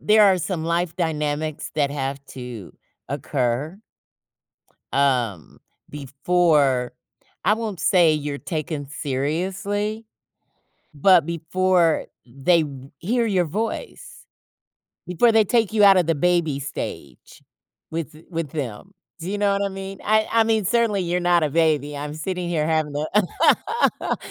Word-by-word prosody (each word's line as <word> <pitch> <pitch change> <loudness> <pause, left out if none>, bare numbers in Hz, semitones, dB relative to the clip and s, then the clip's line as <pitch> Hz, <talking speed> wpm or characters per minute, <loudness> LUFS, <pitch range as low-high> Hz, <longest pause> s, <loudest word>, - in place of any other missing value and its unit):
there 215 0 +5
are 190 -2 +5
some 170 -2 -3
life 170 0 -1
dynamics 155 -2 -2
that 145 -2 +1
have 140 -1 -4
to 125 -7 -8 0.3
occur. 140 +4 -2 1.2
Um, 125 - 0 0.3
before 140 -3 +1 0.5
I 210 - +5
won't 220 -5 -4
say 175 -4 +4
you're 145 -1 -3
taken 155 -3 -4
seriously, 185 +10 -2 0.9
but 165 +2 +5
before 170 0 +1 0.2
they 140 +8 +2
r - - -6 0.3
hear 230 - 0
your 190 -5 +2
voice. 225 - -5 0.8
Before 180 +7 +3
they 220 -1 +6
take 225 0 +1
you 215 -2 +4
out 195 -1 +8
of 175 -3 +2
the 165 - +2
baby 165 -3 +1
stage 70 - -7 0.5
with 160 -1 -4
th 155 +2 -16
with 165 -5 -4
them. 145 - -6 0.3
Do 170 +2 -5
you 205 - -2
know 205 0 +2
what 200 0 0
I - - -2
mean? 195 0 -7
I 215 +1 +2
I 230 -1 +4
mean, 220 -2 +1
certainly 230 -1 +2
you're 175 +1 0
not 175 -1 +3
a 150 - +1
baby. 150 -2 +1
I'm 145 +1 -5
sitting 180 +3 -4
here 155 -3 0
having 155 -2 0
a 210 - +1
165 Hz, 140 wpm, -22 LUFS, 145-195 Hz, 1.2 s, out